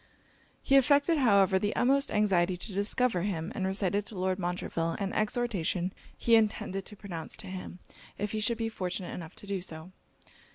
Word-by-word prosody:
He 275 - +5
affected, 285 +4 +4
however, 200 -6 +4
the 205 +2 -1
utmost 275 +3 +3
anxiety 185 -4 +2
to 195 +3 -5
discover 205 0 +1
him; 170 -4 -2
and 190 - -1
recited 195 +1 0
to 210 - -6
Lord 185 +1 0
Montreville 175 -2 -2
an 200 -2 -3
exhortation 205 -5 0 0.2
he 235 - +1
intended 210 -3 0
to 210 - -8
pronounce 175 -6 -6
to - - -7
him, 185 -1 -7 0.4
if 205 0 -2
he 215 - -2
should 225 +2 0
be 225 0 -1
fortunate 185 -4 -4
enough 165 -2 -8
to - - -8
do 200 -2 -2
so. 165 0 -6
195 Hz, 175 wpm, -30 LUFS, 180-220 Hz, 0.4 s, He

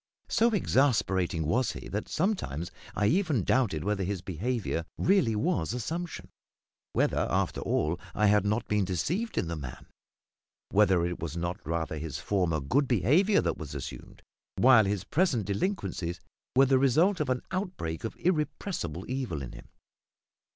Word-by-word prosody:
So 230 +2 +4
exasperating 105 - +1
was 115 +9 +1
he - - -8
that 105 +2 -4
sometimes 155 - -1 0.2
I 105 - +1
even 160 - +2
doubted 100 - +1
whether 100 0 0
his 95 -1 -3
behaviour 95 -1 -2
really 180 - +3
was 105 -1 0
assumption 165 +8 -4 0.6
whether, - - +1
after - - 0
all, 80 +3 0 0.2
I 105 - +3
had 105 0 +4
not 105 +3 0
been 105 -1 +2
deceived 155 - -2
in - - +1
the 85 - -3
man; 65 -5 -8 0.9
whether 90 -2 +4
it 90 0 -3
was 80 0 -4
not 85 +4 -2
rather 80 -1 -2
his 75 -3 -4
former 85 0 0
good 130 - +1
behaviour 150 - +3
that - - -2
was 75 -3 -7
assumed, 70 - -8 0.3
while 125 -4 +6
his 100 -1 -1
present 135 - +1
delinquencies 100 - -2 0.4
were 135 +1 +7
the 135 0 +4
result 160 +9 +3
of 150 -3 -1
an 125 -1 0
outbreak 180 - -3
of 115 - -4
irrepressible 155 - -2
evil 125 - -3
in 60 - -7
him. - - -12
105 Hz, 155 wpm, -29 LUFS, 85-140 Hz, 0.9 s, were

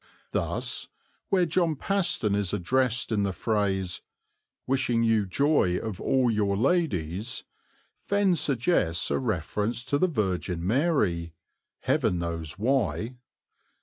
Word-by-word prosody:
Thus, - - -1 0.4
where 185 -2 +3
John 170 -1 +1
Paston 170 - 0
is 100 -2 0
addressed 125 +6 0
in 105 -2 +1
the 100 -1 0
phrase, 95 -2 -1 0.6
"Wishing 125 -3 +1
you 110 -3 +2
joy 120 - +2
of 110 -3 -5
all 130 -3 +2
your 100 -2 +1
ladies," 110 - 0 0.6
Fenn 200 -3 +3
suggests 120 - +1
a - - +1
reference 110 +2 -2
to 145 - +1
the 185 - +4
Virgin 90 - -2
Mary, 100 - +1 0.5
Heaven 90 - +1
knows 85 -2 -3
why. 115 - 0
110 Hz, 115 wpm, -27 LUFS, 90-135 Hz, 0.6 s, the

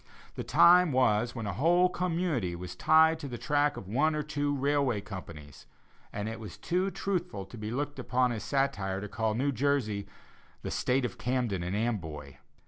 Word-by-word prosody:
The - - -5
time 180 -1 +6
was 120 -2 +2
when 115 -3 -4
a 100 - -2
whole 175 - +4
community 170 - -1
was 90 +1 -7
tied 160 - +4
to 145 - -6
the 120 -2 -6
track 145 +1 +1
of 95 - -8
one 150 +9 +1
or 150 - -1
two 145 -1 -1
railway 140 -4 +1
companies, 85 -8 -10 0.4
and 105 +1 -4
it 110 0 -5
was 105 -5 -9
too 180 +2 0
truthful 180 - -3
to 95 - -12
be 105 -1 -5
looked 145 +3 -3
upon 125 0 +1
as 110 -2 -4
satire 110 -7 -1
to 105 - -5
call 110 +2 -1
New 140 +4 +1
Jersey 125 -6 0 0.6
the - - -4
"State 130 0 +1
of - - -6
Camden 120 -7 -1
and 90 +3 -3
Amboy." 80 - -3
125 Hz, 185 wpm, -29 LUFS, 105-145 Hz, 0.6 s, time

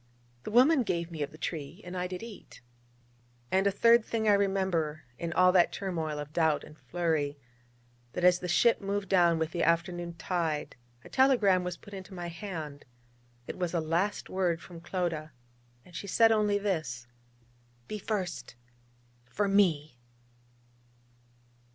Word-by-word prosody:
'The - - -6
woman 260 +6 +5
gave 170 -6 -2
me 160 -2 -6
of 145 - -1
the 155 - -13
tree, 160 +2 -5
and 180 +1 -7
I 180 0 -2
did 180 +2 -6
eat....' 230 -3 -11 0.9
And 190 +1 +3
a - - +3
third 230 +3 +5
thing 220 -1 -2
I 210 - +6
remember 190 -6 0 0.2
in 170 -1 -3
all 180 +1 +5
that 180 -2 +4
turmoil 165 -6 -3
of 150 0 -7
doubt 160 -3 +2
and 150 - -13
flurry: 155 0 -1 0.8
that 180 - -3
as 180 0 +5
the 180 - -5
ship 230 +8 +3
moved 200 -1 -2
down 175 -3 +4
with 160 0 -1
the 170 - -2
afternoon 170 0 0
tide 165 -2 -2 0.3
a - - -13
telegram 225 -9 +4
was 180 -1 -4
put 205 - -14
into 190 0 -8
my 175 -1 -5
hand; 165 -6 -7 0.6
it - - -7
was 175 -1 -1
a - - +2
last 170 +6 -1
word 180 -3 0
from 170 0 -12
Clodagh; 170 -3 -2 0.6
and 175 - -16
she 200 - -5
said 225 +4 +5
only 210 -2 +3
this: 155 -12 -2 0.8
'Be 215 - -5
first 195 - -4 0.7
for 205 +11 -1
Me.' 160 -10 +2
180 Hz, 160 wpm, -30 LUFS, 160-200 Hz, 0.9 s, I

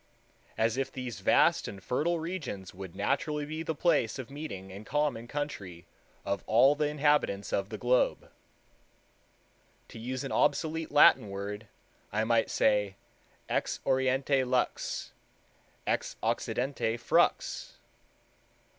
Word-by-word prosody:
As 110 +2 +1
if 135 - -1
these 125 -4 -6
vast - - +3
and 100 -2 -8
fertile 160 - 0
regions 155 - -5
would 95 -1 -9
naturally 145 +8 -1
be 155 +2 -5
the 160 -1 -3
place 145 -8 +2
of 130 -1 -7
meeting 95 -11 -7
and 100 +3 -9
common 145 -4 -1
country 100 - -5 0.4
of 100 -1 -2
all 125 +6 +6
the 150 0 0
inhabitants 145 -9 +1
of 100 0 0
the 110 - -5
globe." 125 +2 +1 1.6
To - - -10
use 125 +3 -4
an 135 - -5
obsolete 160 +2 +1
Latin 130 -6 +6
word, 100 +2 -5 0.4
I 110 +1 +1
might 115 0 +2
say, 105 -2 +2 0.5
Ex - - -1
oriente 130 +1 +2
lux; 125 -1 -1 0.7
ex - - -1
occidente 125 -3 -1
FRUX. 115 - +1
125 Hz, 125 wpm, -30 LUFS, 105-145 Hz, 1.6 s, all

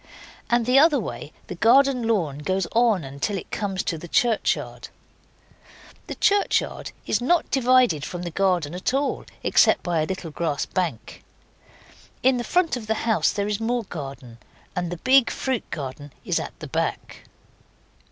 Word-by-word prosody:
And 240 -1 +2
the 255 +3 +5
other 300 -2 +5
way 155 -7 -6
the - - -6
garden 250 +4 +4
lawn 165 -11 0
goes 190 +4 -1
on 190 - +1
till 200 +7 -1
it - - -9
comes 195 -3 -2
to 165 - -3
the 175 - -9
churchyard. 230 +5 0 1.2
The - - -5
churchyard 410 -1 +1
is - - 0
not 335 +7 +1
divided 250 - +3
from 175 +2 -5
the 175 - -4
garden 175 -4 0
at 185 +8 -1
all 280 +1 -1 0.2
except - - +4
by 170 -3 0
a 155 - -1
little 180 -3 -5
grass 150 -2 -2
bank. 170 - -4 1.0
In 260 0 +4
the 240 - -2
front 350 +3 +1
of 230 -3 -7
the 220 - +1
house 225 -2 +2
there 200 0 -2
is 210 0 -1
more 235 +1 -1
garden, 135 - -8 0.4
and 175 -1 -2
the 175 - -4
big 260 +6 +4
fruit 260 -4 -3
garden 145 0 -6
is - - +1
at - - -7
the - - -6
back. - - -3
200 Hz, 165 wpm, -24 LUFS, 165-245 Hz, 1.2 s, the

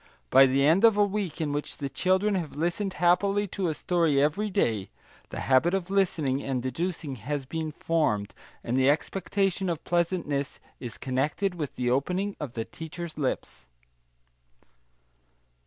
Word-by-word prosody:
By 135 +1 +8
the 135 +2 +2
end 165 +8 +4
of 225 -3 +6
a 205 - +5
week 200 -4 -3
in 155 -3 -1
which 145 0 -4
the 140 - -3
children 190 +7 +1
have 175 -6 -3
listened 175 +5 -1
happily 195 +4 +2
to 190 0 -2
a 160 - -1
story 165 -5 +2
every 155 +9 +1
day, 110 - 0 0.4
the - - -5
habit 135 +8 +3
of 190 0 -3
listening 160 -9 +1
and 135 -2 -2
deducing 145 +2 -3
has 140 +5 -4
been 160 +2 -3
formed, 150 -11 0 0.3
and 120 - -2
the 130 +1 +4
expectation 195 +4 0
of 165 -2 -3
pleasantness 170 -5 -1 0.2
is 120 -4 -7
connected 150 +9 -1
with 155 -5 -5
the 125 -1 0
opening 180 +10 0
of 145 -6 -5
the 115 -2 -3
teacher's 160 0 -8
lips. 135 -3 -3
160 Hz, 155 wpm, -27 LUFS, 135-185 Hz, 0.4 s, By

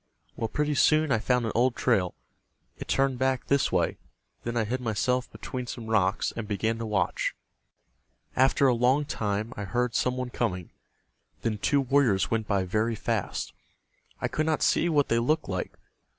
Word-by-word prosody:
Well, 115 - -2
pretty 150 +6 -1
soon 155 +1 +3
I 115 - +3
found 125 +1 +1
an 110 - -1
old 125 +2 +2
trail. 100 -9 +1 0.6
It - - -8
turned 135 -2 +1
back 130 -1 +1
this 140 -1 +2
way. 85 -3 0 0.4
Then 120 0 -3
I 115 - +2
hid 125 +4 -2
myself 125 +2 0
between 125 -1 -6
some 120 -1 -6
rocks, 105 -2 +1
and 110 -2 -5
began 110 +2 -1
to 115 - -3
watch. 100 -4 0 1.0
After 135 +1 +4
a 130 - +5
long 125 +5 +2
time 105 -3 -2
I 100 - -5
heard 120 +5 -1
some 125 +2 0
one 125 -1 -3
coming. 90 -9 -2 0.7
Then 110 -2 -1
two 140 +6 +2
warriors 125 - +2
went 115 -1 0
by 100 -2 +1
very 110 +5 0
fast. - - -2 0.7
I - - 0
could 155 +1 -1
not 155 -1 +1
see 175 - +3
what 145 -3 +3
they 115 - +2
looked 155 +7 +1
like. 95 -2 -4
120 Hz, 180 wpm, -27 LUFS, 105-130 Hz, 1.0 s, a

